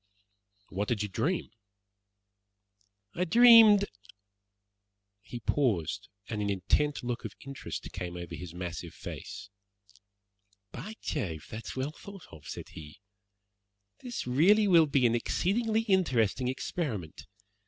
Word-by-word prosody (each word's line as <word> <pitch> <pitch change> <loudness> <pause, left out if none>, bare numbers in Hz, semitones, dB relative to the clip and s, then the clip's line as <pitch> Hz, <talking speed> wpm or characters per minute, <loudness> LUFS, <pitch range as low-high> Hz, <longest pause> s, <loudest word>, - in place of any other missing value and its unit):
"What 100 +2 -2
did 110 -4 0
you 105 - -4
dream?" 170 - -1 1.6
"I 180 - -1
dreamed 220 +1 +8 0.7
" 100 0 -54 0.5
He 120 +2 -8
paused, 110 - 0 0.2
and 105 -2 -3
an 100 - -1
intent 125 +10 0
look 120 0 -3
of - - -6
interest 140 -1 -6
came 90 -1 -5
over 85 -1 -7
his 90 -2 -7
massive 90 -1 -6
face. 100 - -8 1.2
"By 205 - -7
Jove, 85 - -3
that's 110 +1 -7
well 130 +3 -2
thought 195 +3 -12
of," 75 -3 -13
said - - -7
he. 75 +3 -11 1.0
"This 245 -2 -5
really 185 +12 +4
will 170 -4 +6
be 140 -3 +2
an 115 - +4
exceedingly 220 - 0
interesting 130 - +1
experiment. 125 - -4
125 Hz, 120 wpm, -30 LUFS, -, 1.6 s, dreamed